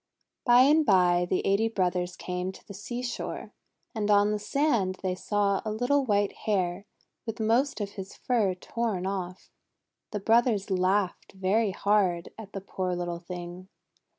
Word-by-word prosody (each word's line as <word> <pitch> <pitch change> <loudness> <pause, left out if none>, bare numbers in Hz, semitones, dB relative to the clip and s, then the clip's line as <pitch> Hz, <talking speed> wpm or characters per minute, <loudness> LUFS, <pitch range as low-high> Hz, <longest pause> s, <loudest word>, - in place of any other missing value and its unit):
By 245 -1 +7
and 300 +4 +5
by 180 -6 +4
the 185 - 0
eighty 200 +3 +3
brothers 180 -4 -1
came 180 0 -4
to - - -15
the 200 - -8
seashore, 240 +4 -5 0.4
and 215 -3 -2
on 205 0 +5
the 210 - -1
sand 210 -5 +1
they 185 -1 0
saw 200 +1 0
a 215 - -3
little 245 +6 +1
white 205 -3 +2 0.2
Hare 190 -1 0 0.4
with 225 0 -4
most 230 +3 +1
of 205 -1 -5
its 195 0 -7
fur 215 -7 +1
torn 205 -1 -3
off. 185 -2 -5 0.6
The 210 - -3
brothers 225 -1 +2
laughed 185 0 0
very 195 +3 +1
hard 190 -3 +1
at 215 -3 -11
the 195 - -5
poor 185 -2 -3
little 175 -1 -3
thing. 180 +1 -8
200 Hz, 155 wpm, -28 LUFS, 185-220 Hz, 0.6 s, By